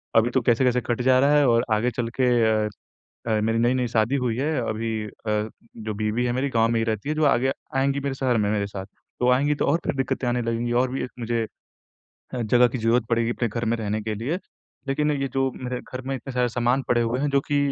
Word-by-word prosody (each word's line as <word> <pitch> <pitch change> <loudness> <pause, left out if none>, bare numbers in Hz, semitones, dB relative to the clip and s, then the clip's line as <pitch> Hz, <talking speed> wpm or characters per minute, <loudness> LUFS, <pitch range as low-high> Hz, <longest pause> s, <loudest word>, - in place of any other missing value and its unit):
अभी 115 +1 +5
तो 130 +1 +1
कैसे-कैसे 125 +1 +2
कट 120 0 -1
जा 130 0 +4
रहा 140 +2 +4
है 145 - +4
और 115 -1 +4
आगे 115 +4 +1
चल 115 0 -3
के 130 - +4 0.4
अ - - -2 0.6
अ, 110 -1 +2
मेरी 115 +1 +1
नई-नई 125 +1 +2
शादी 115 +2 +1
हुई 125 -4 0
है। 150 +4 0
अभी 110 +1 -2 0.2
अ, - - -7 0.7
जो 110 -1 -4
बीवी 110 +3 0
है 120 - +1
मेरी 130 +3 0
गाँव 115 -3 +3
में 115 0 +1
ही - - +1
रहती 110 +4 -2
है 155 - 0
जो 155 - +1
आगे 135 -1 +3 0.2
आएँगी 135 +1 +1
मेरे 140 -1 -3
शहर 130 -3 +1
में 105 -2 +1
मेरे 100 -1 0
साथ, 95 -1 -7
तो 125 +4 -4
आएँगी 145 +4 +3
तो - - 0
और 145 - +3
फिर - - -1
दिक्कतें 135 -1 -1
आने 120 0 +1
लगेंगी 115 +1 -1
और 130 - -2
भी 130 - -2
मुझे 115 -1 -1 0.9
ह 120 - -1
जगह 120 +3 +5
की 120 - -4
ज़रूरत 115 +1 +2
पड़ेगी 115 0 +1
अपने 120 0 -1
घर 115 +2 -3
में 115 +1 +1
रहने 110 -1 -2
के 110 0 -3
लिए। 125 - -2 0.5
लेकिन 150 +2 +1
ये 135 -2 -1
जो 135 0 +1
मेरे 125 -1 -4
घर 130 - -7
में 135 - -1
इतने 135 +1 -7
सारे 125 -1 +1
सामान 120 +3 +1
पड़े 120 -1 +3
हुए 115 +2 0
हैं 145 +1 0
जो 140 0 +3
कि 145 - +1
120 Hz, 245 wpm, -24 LUFS, 115-135 Hz, 0.9 s, अभी